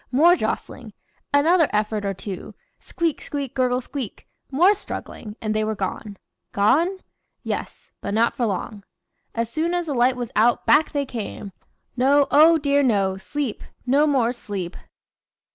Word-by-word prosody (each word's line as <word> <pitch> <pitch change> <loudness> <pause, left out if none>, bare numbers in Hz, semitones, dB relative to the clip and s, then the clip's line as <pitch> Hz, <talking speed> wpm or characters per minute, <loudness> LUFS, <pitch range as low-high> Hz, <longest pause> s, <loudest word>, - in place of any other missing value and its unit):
more 325 +7 +6
jostling, - - -4 0.4
another 320 +3 +4
effort 210 0 -1
or 200 - 0
two 190 0 -7 0.2
squeak 335 -3 -2
squeak 280 -3 -5
gurgle 255 -1 +1
squeak 255 -3 -7 0.2
more 345 +9 +5
struggling 215 - -8
and 215 -1 -2
they 215 0 0
were 215 0 -1
gone. 200 +1 -5 0.4
Gone? 330 - +2 0.4
Yes! - - -5
but 200 - -3
not 230 +2 +2
for 240 - 0
long. 200 +1 -4 0.5
As 230 0 -1
soon 320 +8 -1
as 350 -1 -1
the 300 - -3
light 250 +1 +3
was 245 -2 -5
out 230 +2 +3
back 265 +8 +4
they 285 -2 -1
came. 215 -4 -6 0.4
No! 275 +3 +4
oh, 320 +3 +7
dear 285 -1 +2
no! 200 -7 +1
sleep! 265 +4 -4 0.2
no 280 +4 +3
more 255 -5 +2
sleep. 200 -7 -6
250 Hz, 155 wpm, -23 LUFS, 215-290 Hz, 0.5 s, oh